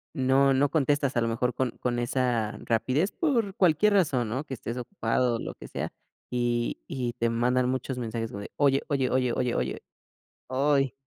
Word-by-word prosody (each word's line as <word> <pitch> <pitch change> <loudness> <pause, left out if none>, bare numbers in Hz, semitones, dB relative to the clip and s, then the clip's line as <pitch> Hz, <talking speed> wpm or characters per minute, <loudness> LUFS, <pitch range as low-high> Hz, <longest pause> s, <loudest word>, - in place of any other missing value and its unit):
no 135 +1 +4
no 140 +1 +3
contestas, 145 -3 +1
a - - +3
lo 115 - +1
mejor, 120 +2 0
con 130 -2 -1
con 120 -1 -1
esa 120 -3 0
rapidez 130 - +1
por 230 - 0
cualquier 190 +3 +4
razón, 135 - +2
¿no?, 130 +7 -3
que 130 - -5
estés 115 +2 -5
ocupado, 125 - 0
o - - -8
lo - - -5
que - - -11
sea, - - -4 0.4
y 120 - 0
y 125 -2 -3
te 115 0 0
mandan 125 +2 +1
muchos 130 0 -2
mensajes, 115 -1 -3
o 100 - -5
de: 100 - -8
"Oye, 140 -1 +3
oye, 135 -3 +1
oye, 125 -2 +2
oye, 125 -2 0
oye", - - -2 0.6
¡oy! 135 0 +1
130 Hz, 190 wpm, -27 LUFS, 120-140 Hz, 0.6 s, no